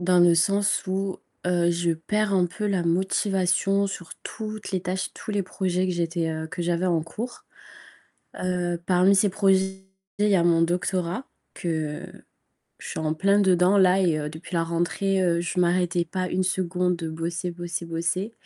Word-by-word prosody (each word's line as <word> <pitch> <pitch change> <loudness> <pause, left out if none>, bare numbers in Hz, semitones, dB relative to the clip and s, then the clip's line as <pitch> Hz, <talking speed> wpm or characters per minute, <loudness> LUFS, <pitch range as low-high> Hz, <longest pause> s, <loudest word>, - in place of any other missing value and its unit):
dans 180 0 +3
le 175 -1 +6
sens 200 +5 +2
où, 190 0 -2 0.3
heu, 175 -1 +2
je 170 0 0
perds 210 +6 -1
un 180 -2 +3
peu 210 +5 -4
la 195 -4 +1
motivation 190 +2 +1
sur 180 -4 -7
toutes 215 -1 -6
les 185 - 0
tâches, 185 +1 -3
tous - - -8
les 205 -1 0
projets 185 0 -1
que 185 - 0
j'étais, 170 -1 -1
heu 160 0 -4
que 175 +2 -5
j'avais 175 +1 0
en 165 -3 +2
cours. 240 - -7 1.0
Heu, 180 -1 -1
parmi 185 +2 +4
ces 205 +1 +3
projets 190 0 +1 0.4
il 210 - +3
y 200 - +4
a 170 - +2
mon 170 -1 +4
doctorat, 180 +5 -1 0.3
que 155 -3 -3 0.8
je - - -9
suis - - -5
en 155 -1 0
plein 200 +5 +3
dedans 185 0 +4
là 190 0 +5
et 165 -4 +2
heu, 150 0 -4
depuis 160 +4 -9
la 165 -1 +2
rentrée, 175 +3 0
heu, 170 -2 +2
je 180 +1 -1
m'arrêtais 175 -1 +1
pas 185 +2 -2
1 185 +1 0
seconde 180 -1 0
de 165 -1 -5
bosser, 170 +2 -3
bosser, 175 0 -5
bosser, 170 +6 -2
180 Hz, 180 wpm, -25 LUFS, 170-190 Hz, 1.0 s, le